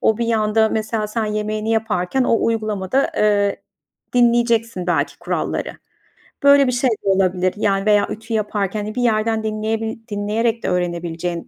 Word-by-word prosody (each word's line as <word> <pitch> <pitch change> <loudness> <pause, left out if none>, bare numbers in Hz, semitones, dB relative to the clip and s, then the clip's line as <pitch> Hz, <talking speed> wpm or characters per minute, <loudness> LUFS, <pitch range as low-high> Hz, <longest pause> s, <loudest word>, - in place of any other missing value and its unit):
o 220 0 +2
bir 235 - -1
yanda, 220 -1 +2
mesela, 215 0 -2
sen 220 +1 -2
yemeğini 215 +1 -2
yaparken 225 +1 0
o 230 - +2
uygulamada, 215 +2 0
eee, 205 -1 +1 0.5
dinleyeceksin 235 -5 +2
belki 175 - 0
kuralları. - - -3 0.7
Böyle 280 -1 +6
bir - - +2
şey 255 +1 +1
de 215 -3 -2
olabilir, 185 -1 +2
yani 195 -1 0
veya 210 -1 +4
ütü 225 +1 -6
yaparken, 210 -1 -1
hani, 215 +1 -6
bir 250 - -1
yerden 220 -1 +1
dinleyebi 220 +1 -2
dinleyerek 220 +3 -1
de - - -1
öğrenebileceğin 175 -1 -3
215 Hz, 150 wpm, -20 LUFS, 200-225 Hz, 0.7 s, Böyle